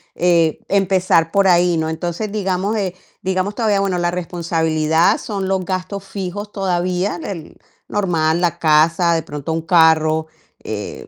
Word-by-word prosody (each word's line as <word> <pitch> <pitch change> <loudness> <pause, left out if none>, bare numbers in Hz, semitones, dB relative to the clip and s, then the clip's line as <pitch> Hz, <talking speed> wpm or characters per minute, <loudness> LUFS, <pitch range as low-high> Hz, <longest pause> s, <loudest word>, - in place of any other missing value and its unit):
eh, 170 -3 +2
empezar 185 -4 +2
por 200 -1 +3
ahí, 175 -1 +4
¿no? 160 0 -1
Entonces, 175 +6 -3
digamos, 195 0 -1
eh, 190 -4 -2 0.3
digamos 190 +2 -1
todavía 215 -4 +1
bueno, 195 -2 0
la 175 0 0
responsabilidad 165 - +1
son 200 -5 -4
los 190 -1 0
gastos 185 +2 -4
fijos 195 +1 -6
todavía, 185 -1 -1
el 165 -4 -7 0.3
normal, 170 -4 0
la 175 -2 0
casa, 165 +2 +3
de 165 - -1
pronto 150 +2 -5
un 165 - -1
carro, 160 -1 +3 0.4
eh, 105 -1 -6
175 Hz, 145 wpm, -19 LUFS, 160-195 Hz, 0.4 s, ahí